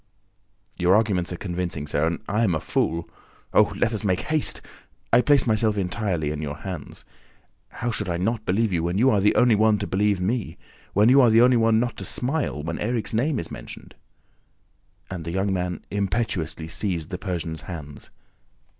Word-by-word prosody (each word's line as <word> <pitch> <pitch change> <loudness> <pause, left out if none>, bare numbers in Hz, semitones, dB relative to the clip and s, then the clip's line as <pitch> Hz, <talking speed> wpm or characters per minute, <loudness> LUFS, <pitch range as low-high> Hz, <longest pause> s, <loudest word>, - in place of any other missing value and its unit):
"Your 90 +2 +4
arguments 100 -5 +1
are - - -3
convincing, 85 -5 -3
sir, 75 +1 0
and 85 +5 -3
I 105 +3 +1
am 95 -7 +2
a - - -1
fool!... 85 +3 -1 0.5
Oh, - - +5
let 115 - +1
us 110 - -3
make 95 -3 +1
haste! 155 -1 -1 0.5
I 120 - +7
place 145 0 +4
myself 110 -2 +2
entirely 90 -5 -1
in 75 0 -4
your 75 -1 -4
hands!... 90 -5 -8 0.6
How 120 0 -3
should 105 -3 -2
I 85 - -1
not 110 +5 -1
believe 100 +2 +1
you, 85 - +1
when 85 +3 -1
you 130 +5 +4
are 100 - +2
the 105 - +3
only 120 -2 +5
one 110 0 +4
to 100 - -3
believe 100 0 +1
me... 105 +4 -2 0.4
when 105 +4 +5
you 135 +2 +7
are 120 - +6
the 110 +1 +5
only 125 0 +5
one 115 -1 +3
not 120 0 -2
to - - -6
smile 130 - -2
when 80 +1 -4
Erik's 115 +1 -2
name 130 +5 +1
is 85 - -4
mentioned?" - - -10 1.2
And 90 -3 -5
the 85 - -5
young 95 +1 0
man 90 -1 -3
impetuously 95 -6 -2
seized 85 -2 -3
the 90 - -4
Persian's 85 -5 -4
hands. 75 -5 -9
100 Hz, 190 wpm, -24 LUFS, 85-115 Hz, 1.2 s, I